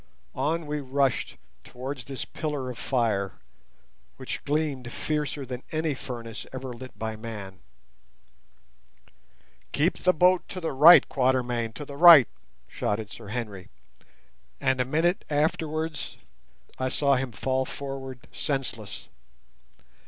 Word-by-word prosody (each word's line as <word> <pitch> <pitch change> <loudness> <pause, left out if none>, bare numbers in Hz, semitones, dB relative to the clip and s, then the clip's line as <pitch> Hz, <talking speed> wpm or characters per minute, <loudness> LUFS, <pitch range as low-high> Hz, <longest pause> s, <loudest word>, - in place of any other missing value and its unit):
On 155 +5 -1
we 150 0 -2
rushed 135 -1 0 0.3
towards 130 0 -7
this 135 -2 -5
pillar 145 -5 -4
of 120 - -10
fire, 110 -7 0 0.8
which - - -5
gleamed 140 -5 -1
fiercer 150 -1 -2
than 125 0 -6
any 155 -1 0
furnace 115 -4 -7
ever 130 -1 -6
lit 130 -2 -11
by 110 +1 -3
man. 105 -4 -8 2.1
"Keep 165 +5 +1
the 185 - +4
boat 180 +1 +4
to 185 - -5
the 165 - -2
right, 155 +6 +9
Quatermain—to 125 -1 0
the 140 0 -9
right," 165 -6 +10 0.4
shouted 105 0 -3
Sir 110 0 -10
Henry, 105 -4 -5 0.9
and 130 -2 +2
a - - +1
minute 165 +7 +1
afterwards 155 +1 -1 0.6
I 130 0 0
saw 140 +1 +3
him 130 -1 -2
fall 130 +5 -1
forward 135 -3 -7
senseless. 130 -8 -4
130 Hz, 120 wpm, -27 LUFS, 120-150 Hz, 2.1 s, right